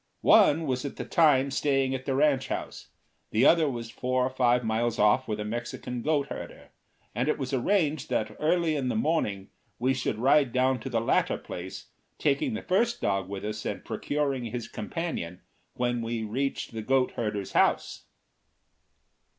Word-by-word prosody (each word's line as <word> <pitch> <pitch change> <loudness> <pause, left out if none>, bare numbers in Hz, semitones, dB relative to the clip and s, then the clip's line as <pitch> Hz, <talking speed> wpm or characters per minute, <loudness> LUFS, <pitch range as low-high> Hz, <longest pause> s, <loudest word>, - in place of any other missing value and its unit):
One 160 +2 +6
was 130 -3 -1
at 140 - -5
the - - -5
time 140 -4 +3
staying 135 -1 +1
at 130 -1 -4
the 135 - 0
ranch 140 -2 +2
house, - - -5 0.4
the 110 +4 +3
other 165 -3 +5
was 115 -3 -5
four 130 +1 0
or 130 - -2
five 125 -1 +2
miles 115 +1 0
off 105 +5 +3
with 105 -1 -3
a 105 - -3
Mexican 120 +2 -4
goat 145 0 0
herder, - - -8 0.4
and 125 +5 0
it - - +1
was 135 -1 -4
arranged 155 +1 +1
that 110 0 -1
early 165 0 +2
in 135 -3 -1
the - - -1
morning 155 - -1 0.3
we 130 +2 +1
should 125 -4 -2
ride 135 +2 +4
down 130 +1 +2
to 135 - -6
the 115 -3 +1
latter 115 - +1
place, 90 +1 -8 0.3
taking 150 - +1
the - - -5
first 235 +6 +1
dog 95 -2 -1
with 100 0 -5
us 110 +1 -4
and - - -4
procuring 140 -4 -2
his 120 +1 -5
companion 105 - -5 0.3
when 120 -1 0
we 115 0 -3
reached 130 +6 -2
the 115 -1 -5
goat 130 +3 +2
herder's 105 -4 -3
house. - - +1
130 Hz, 175 wpm, -28 LUFS, 115-145 Hz, 0.4 s, One